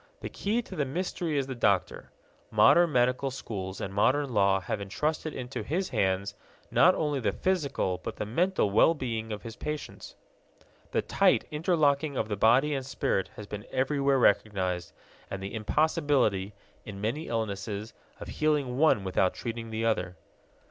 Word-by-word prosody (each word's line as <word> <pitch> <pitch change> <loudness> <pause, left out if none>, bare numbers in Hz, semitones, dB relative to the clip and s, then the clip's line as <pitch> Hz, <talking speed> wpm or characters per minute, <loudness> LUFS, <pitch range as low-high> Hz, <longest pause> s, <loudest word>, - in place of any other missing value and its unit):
The - - -5
key 225 +4 -1
to 190 - -10
the 150 - 0
mystery 165 +2 -2
is 135 - +1
the 135 - -5
doctor. 100 -7 0 0.4
Modern 175 -1 +5
medical 125 +1 +2
schools 95 -7 -6
and 95 - -5
modern 130 +6 +2
law 100 -2 +3
have 100 +3 -4
entrusted 150 +10 -2
into 125 -1 -5
his 180 +6 -2
hands 95 +1 0 0.4
not 185 +1 +5
only 150 -3 -1
the 105 -5 0
physical 140 - -1
but 110 - -6
the - - -4
mental 165 - +1
well 165 +10 +5
being 115 -5 -4
of 105 -1 -5
his 115 -1 -8
patients. 150 +2 -6 0.7
The - - 0
tight - - +3
interlocking 150 -3 +1
of - - -1
the 105 - -1
body 125 +9 +4
and 135 -2 -2
spirit 125 -7 -1
has 105 - -8
been 105 0 -8
everywhere 135 +1 +1
recognized, 95 -6 +1 0.4
and 95 - -4
the 95 +1 -6
impossibility, 115 - +1 0.3
in 100 -2 -8
many 120 +10 -2
illnesses, 105 -1 -3 0.3
of - - -8
healing 145 -5 0
one 155 -10 +4
without 95 0 +1
treating 115 -1 -5
the 110 +1 -2
other. 95 -5 0
120 Hz, 160 wpm, -28 LUFS, 100-150 Hz, 0.7 s, Modern